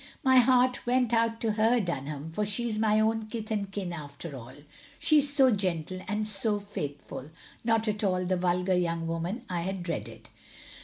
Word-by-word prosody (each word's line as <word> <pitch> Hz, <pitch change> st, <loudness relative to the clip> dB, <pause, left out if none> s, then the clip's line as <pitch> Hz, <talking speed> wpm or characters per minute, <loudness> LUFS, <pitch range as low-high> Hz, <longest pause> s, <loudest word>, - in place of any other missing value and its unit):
My 260 Hz, -2 st, +5 dB
heart 250 Hz, 0 st, +4 dB
went 245 Hz, -1 st, +2 dB
out 230 Hz, 0 st, +2 dB
to 225 Hz, -, +1 dB
her, 225 Hz, +3 st, +3 dB
Dunham, 150 Hz, -4 st, -4 dB
for 210 Hz, +6 st, -1 dB
she 210 Hz, +4 st, -1 dB
is 215 Hz, -2 st, -1 dB
my 215 Hz, -1 st, +3 dB
own 220 Hz, 0 st, +1 dB
kith 215 Hz, 0 st, -6 dB
and 200 Hz, -2 st, -2 dB
kin 190 Hz, -3 st, -4 dB
after 150 Hz, -1 st, -7 dB
all. 125 Hz, +1 st, -10 dB, 0.4 s
She 305 Hz, -1 st, +4 dB
is 285 Hz, 0 st, +3 dB
so 270 Hz, -3 st, +5 dB
gentle 185 Hz, -3 st, -2 dB
and 210 Hz, +1 st, -1 dB
so 210 Hz, 0 st, +1 dB
faithful. 145 Hz, -8 st, -6 dB, 0.3 s
Not 225 Hz, -1 st, +2 dB
at 210 Hz, 0 st, -1 dB
all 185 Hz, -2 st, +1 dB
the 185 Hz, +1 st, +1 dB
vulgar 180 Hz, +1 st, +1 dB
young 170 Hz, -2 st, 0 dB
woman 170 Hz, +9 st, -3 dB
I 175 Hz, -2 st, -2 dB
had 190 Hz, +1 st, -3 dB
dreaded. 170 Hz, -2 st, -5 dB
205 Hz, 190 wpm, -28 LUFS, 175-225 Hz, 0.4 s, My